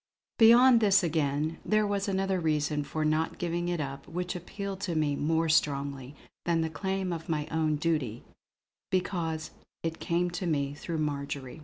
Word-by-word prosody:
Beyond 240 +2 +8
this 200 -3 +4
again, 155 -1 0
there 215 0 +2
was 200 -1 -1
another 195 -1 0
reason 150 -2 0
for 155 +2 -2
not 155 +1 0
giving 175 0 -2
it 175 -1 -1
up 140 -1 -5
which 180 +1 -3
appealed 195 +2 -5
to 180 -5 -2
me 150 -2 +1
more 160 +3 +1
strongly 140 -3 0 0.3
than 170 -1 +1
the 160 0 -1
claim 190 +3 -2
of 165 0 -7
my 150 -2 0
own 160 -1 +1
natural 165 +3 +1
duty, 125 -7 -3 0.7
because 165 -4 -1 0.3
it 165 0 -3
came 175 +1 0
to 180 +1 -3
me 140 -3 0
through 165 +3 -5
Marjory. 140 -3 -3
160 Hz, 170 wpm, -29 LUFS, 150-180 Hz, 0.7 s, Beyond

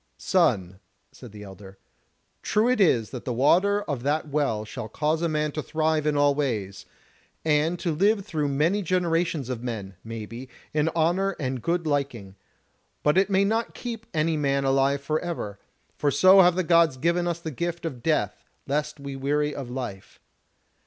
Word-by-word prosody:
"Son," 100 - +1 0.3
said 120 - -13
the 105 0 -10
elder, 95 0 -12 0.6
"true 215 +3 +1
it 250 -3 +2
is 120 - +3
that 125 - -6
the 125 - -3
water 185 - +3
of 140 -5 -4
that 150 +4 0
Well 140 -8 -1
shall 110 0 -7
cause 155 +6 0
a 170 - +1
man 150 -1 0
to 155 - -3
thrive 155 0 0
in 150 -1 +1
all 145 0 +4
ways, 105 -9 -3 0.6
and 155 +3 +2
to 170 -2 -2
live 200 +5 +2
through 155 -7 -1
many 155 +9 +1
generations 170 -5 0
of 125 -3 -4
men, 110 -6 -5
maybe, 115 +3 -7 0.2
in 155 +1 +2
honour 175 +4 +1
and 130 -3 -3
good 170 +3 -1
liking; 135 -10 -2 0.7
but 150 - +3
it 190 +1 +3
may 195 0 +3
not 225 +3 -1
keep 230 -2 -6
any 160 -1 0
man 140 -2 +1
alive 135 +1 +2
for 155 +2 -1
ever; 160 - -5 0.4
for 145 - +2
so 185 +8 +7
have 180 -1 +5
the 185 - +1
Gods 165 -5 +4
given 170 +5 +1
us 170 -1 -1
the 160 -2 -5
gift 170 +4 -4
of 130 -7 -5
death 115 -10 0 0.2
lest 150 +2 -2
we 140 -1 -6
weary 145 +2 0
of 135 -3 -6
life. 120 -7 -7
150 Hz, 180 wpm, -25 LUFS, 130-170 Hz, 0.7 s, so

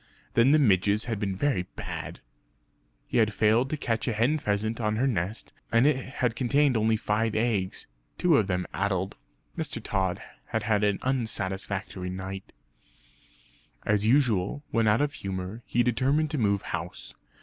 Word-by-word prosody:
Then 115 +3 +5
the 150 - +6
midges 105 -5 +3
had 115 -4 -3
been 100 -2 -2
very 95 -5 0
bad. - - -5
And - - -20 0.8
he - - -2
had 110 -2 +4
failed 110 +5 +3
to 155 - -2
catch 115 -4 -2
a 120 - +1
hen 125 +8 +2
pheasant 110 -1 -1
on 105 -1 0
her 120 +5 +1
nest; 105 -4 -2 0.2
and 115 +3 +4
it 150 -1 +5
had 125 -2 -2
contained 140 +2 +2
only 110 0 +3
five 110 +1 0
eggs, 110 -5 0 0.3
two 170 -5 +4
of 105 - +2
them 90 -2 -1
addled. 95 -1 -1 0.4
Mr. 150 -7 -3
Tod 95 -4 -1 0.3
had 110 -1 -2
had 105 -1 +1
an 105 -1 +2
unsatisfactory 100 -6 -1
night. 95 +1 -6 1.3
As 105 -1 +2
usual, 120 0 +2
when 115 -3 +2
out 105 +5 +4
of 145 -1 0
humour, 95 +3 -5
he 120 - +2
determined 135 +6 +1
to 155 - -1
move 100 -3 +1
house. - - -6
110 Hz, 165 wpm, -27 LUFS, 100-125 Hz, 1.3 s, the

